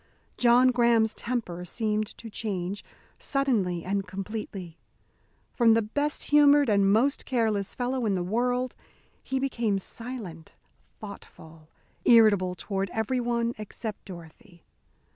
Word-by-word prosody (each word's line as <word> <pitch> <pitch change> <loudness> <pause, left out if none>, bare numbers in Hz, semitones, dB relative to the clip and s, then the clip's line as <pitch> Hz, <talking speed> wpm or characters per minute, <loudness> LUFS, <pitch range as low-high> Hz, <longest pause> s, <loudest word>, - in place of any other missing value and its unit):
John 245 +1 +5
Graham's 235 -3 +3
temper 215 -8 -4
seemed 215 +3 -1
to 230 - -10
change, 200 -3 -4 0.4
suddenly 215 - 0
and 195 0 -2
completely. 190 -3 -6 0.7
From 230 -2 +5
the 230 - +2
best 290 +9 -2
humoured 290 -2 +6
and 200 -2 +3
most 255 +7 +2
careless 220 -6 -1
fellow 250 -1 -1
in 200 - +1
the 180 - -1
world, 245 +6 -1 0.5
he 265 - -3
became 235 -6 0
silent, 195 -6 -7 0.4
thoughtful, 160 -6 -12 0.3
irritable 205 -6 +5
toward 195 0 -3
everyone 235 +2 -1
except 215 0 -7
Dorothy. 175 +1 -13
220 Hz, 115 wpm, -27 LUFS, 195-245 Hz, 0.7 s, humoured